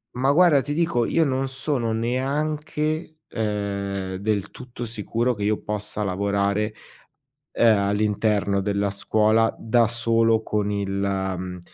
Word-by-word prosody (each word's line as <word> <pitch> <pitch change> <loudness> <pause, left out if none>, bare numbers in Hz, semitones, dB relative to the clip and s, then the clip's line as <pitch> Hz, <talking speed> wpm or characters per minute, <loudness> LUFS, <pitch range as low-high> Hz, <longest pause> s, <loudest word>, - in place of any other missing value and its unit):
Ma 135 +3 +2
guarda, 165 -3 +5
ti 145 +2 -4
dico, 160 -8 +1
io 165 - +2
non 135 -1 0
sono 135 -4 -2
neanche, 150 +6 -2
ehm, 100 -3 -3
del 100 0 -1
tutto 125 -1 -8
sicuro 115 +2 -1
che 105 - -9
io 105 0 +1
possa 105 0 -4
lavorare, 100 +2 0 0.8
ehm, 115 -2 +4
all'interno 100 0 +1
della 100 0 0
scuola, 110 +2 +2
da 115 0 +2
solo, 115 -1 +2
con 105 -1 -1
il 100 -1 -2
mhmm, 95 -2 -2
110 Hz, 130 wpm, -24 LUFS, 100-125 Hz, 0.8 s, guarda